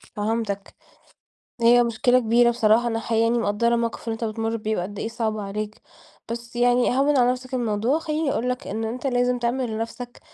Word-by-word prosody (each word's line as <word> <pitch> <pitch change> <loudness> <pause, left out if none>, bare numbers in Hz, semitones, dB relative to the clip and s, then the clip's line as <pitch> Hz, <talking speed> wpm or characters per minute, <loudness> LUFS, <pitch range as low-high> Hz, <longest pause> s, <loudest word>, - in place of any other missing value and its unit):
فهمتَك. 210 -2 -3 0.9
هي 240 +1 +6
مشكلة 240 +2 +2
كبيرة 235 0 +4
بصراحة، 235 0 +3
أنا 225 -1 0
حقيقي 225 0 0
يعني 230 +1 +2
مقدرة 235 +1 +1
الموقف 230 -1 -2
اللى 225 - 0
أنتَ 225 +1 -5
بتمر 225 +1 -2
بيه 215 0 -2
وقد 195 +3 -4
إيه - - -2
صعب 225 -1 -2
عليك، 210 +1 -5 0.5
بس 235 +1 -6
يعني 245 +1 +3
هَوِّن 285 +1 +3
على 245 0 +4
نفسك 255 +1 -4
الموضوع، 235 +4 0
خلّيني 310 -2 -1
أقول 250 - -1
لَك 250 - -4
إن 220 +3 -3
أنت 245 +5 -4
لازم 245 -1 +1
تعمل 240 +1 -1
لنفسك 230 +2 -6
235 Hz, 185 wpm, -24 LUFS, 220-245 Hz, 0.9 s, هي